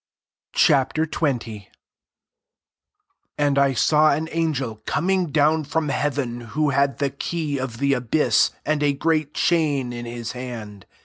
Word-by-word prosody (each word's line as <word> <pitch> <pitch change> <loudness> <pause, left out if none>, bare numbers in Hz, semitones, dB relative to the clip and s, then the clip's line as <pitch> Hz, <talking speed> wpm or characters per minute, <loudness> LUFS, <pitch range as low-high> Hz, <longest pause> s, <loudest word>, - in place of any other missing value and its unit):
Ch. - - +4
XX. 155 +4 +1 0.2
1 105 -4 -9 1.7
And 145 -1 +2
I 140 -1 +3
saw 155 +5 +4
an 155 +3 -1
an 165 0 0
gel 120 -4 -4
coming 185 0 0
down 155 +1 +3
from 150 +1 -2
hea 140 +2 0
ven, 125 -4 -4 0.2
who 150 -2 +2
had 140 0 +1
the 140 -1 -1
key 145 0 -3
of 130 -3 -4
the 140 +2 +2
abyss, 125 +4 +2 0.2
and 150 0 0
a 145 -1 +2
gpreat 155 -1 0
chain 145 -7 +1
in 120 0 -6
his 120 -1 -5
hand. 115 -5 -8
140 Hz, 150 wpm, -22 LUFS, 125-155 Hz, 1.7 s, Ch